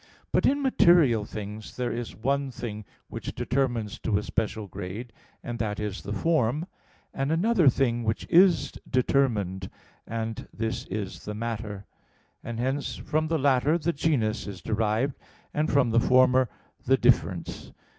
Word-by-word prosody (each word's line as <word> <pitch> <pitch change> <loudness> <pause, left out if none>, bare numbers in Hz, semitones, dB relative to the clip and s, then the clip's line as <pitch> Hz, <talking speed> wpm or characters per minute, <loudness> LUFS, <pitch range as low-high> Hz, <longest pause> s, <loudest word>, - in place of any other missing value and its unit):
But - - +3
in 280 +1 +2
material 170 - +5
things 105 0 -7
there 125 -1 -1
is 115 0 -5
one 140 +4 0
thing 110 -4 -6 0.2
which - - -6
determines 120 -5 -1
to 105 - 0
a 105 - -2
special 110 -1 -2
grade, 100 +5 -7 0.3
and 120 0 -5
that 105 -2 -2
is 105 -2 -3
the 100 - -7
form; 150 - +1 0.5
and 135 +2 -1
another 180 -1 +4
thing 120 -2 +1
which 110 0 -1
is 180 +1 +5 0.2
determined, 110 -8 +1 0.4
and 115 -1 -4
this 110 0 -3
is 100 -1 -5
the 105 - -4
matter; 105 -3 -4 0.6
and 115 -1 -5
hence 135 +3 -1
from 155 +1 -1
the 165 +1 +1
latter 140 +2 +3
the 170 +1 -1
genus 125 -10 0
is 95 -4 -8
derived, 110 +5 0 0.4
and 150 +1 0
from 135 -5 +3
the 115 - +4
former 130 0 +4 0.3
the - - +3
"difference." - - +1
120 Hz, 150 wpm, -27 LUFS, 105-140 Hz, 0.6 s, material